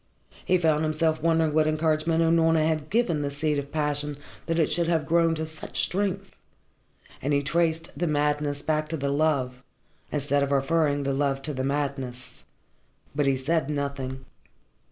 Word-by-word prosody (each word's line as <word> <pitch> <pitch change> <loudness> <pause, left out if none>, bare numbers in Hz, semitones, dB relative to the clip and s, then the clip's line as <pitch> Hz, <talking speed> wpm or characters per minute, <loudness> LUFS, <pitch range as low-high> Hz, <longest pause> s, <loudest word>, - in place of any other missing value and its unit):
He 185 - +3
found 160 -3 +2
himself 155 0 0
wondering 160 -1 +2
what 155 0 +3
encouragement 155 +1 +1
Unorna 165 -1 +3
had 155 -1 -1
given 200 -9 +1
the 145 - -1
seed 145 +1 -1
of 140 0 -7
passion 150 -1 -1 0.3
that 165 0 0
it 165 - +4
should 170 0 +1
have 165 -3 +1
grown 165 0 +3
to 160 0 -2
such 155 -1 -4
strength, 195 0 -1 0.8
and 145 +2 0
he 140 0 +2
traced 165 +2 0
the 175 - -1
madness 145 -1 0
back 155 -1 0
to 160 - -2
the 140 -1 -1
love, 140 -4 0 0.5
instead 145 -1 +1
of 140 0 0
referring 145 +1 +2
the 135 0 0
love 135 0 0
to 150 - -3
the 130 -1 -3
madness. 135 -3 -3 0.7
But 145 -1 +1
he 135 -1 +2
said 150 +2 0
nothing. 140 -3 -3
150 Hz, 170 wpm, -26 LUFS, 140-160 Hz, 0.8 s, it